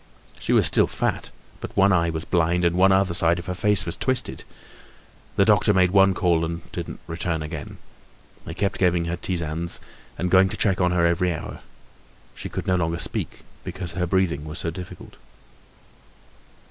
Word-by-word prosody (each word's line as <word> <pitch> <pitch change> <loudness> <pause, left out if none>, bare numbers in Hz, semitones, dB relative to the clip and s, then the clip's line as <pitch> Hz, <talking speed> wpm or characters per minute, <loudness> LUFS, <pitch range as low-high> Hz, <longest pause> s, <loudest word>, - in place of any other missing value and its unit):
She - - -3
was - - +4
still - - +3
fat, - - -2 0.3
but - - -8
one 100 0 +5
eye 85 -1 +2
was 80 0 -4
blind 85 0 +1
and 85 0 +2
one 95 +2 +5 0.2
side 85 0 +3
of 85 - -7
her 90 - -3
face 105 +2 +3
was 85 - -3
twisted. 130 -2 -1 0.9
The - - +4
doctor 105 - +4
made 90 -1 +4
one 95 -1 +4
call 85 -3 +2
and 85 0 -4
didn't - - -6
return 80 0 -3
again. 75 -2 -7 0.7
They - - -8
kept 100 -1 -2
giving 90 -2 +2
her 85 +1 -2
tisanes 85 -2 -2 0.4
and 90 0 -2
going 95 0 +5
to - - -5
check 95 -3 +1
on 90 - +3
her 90 -1 +2
every 85 +1 +1
hour. 80 - -6 0.7
She - - -7
could - - -5
no 90 -1 +2
longer 85 -1 -1
speak - - -5 0.2
because 90 -3 -6
her 90 +1 -2
breathing 85 -5 0
was 75 +1 -7
so 85 - -3
difficult. 90 +2 -10
85 Hz, 180 wpm, -23 LUFS, 85-95 Hz, 0.9 s, one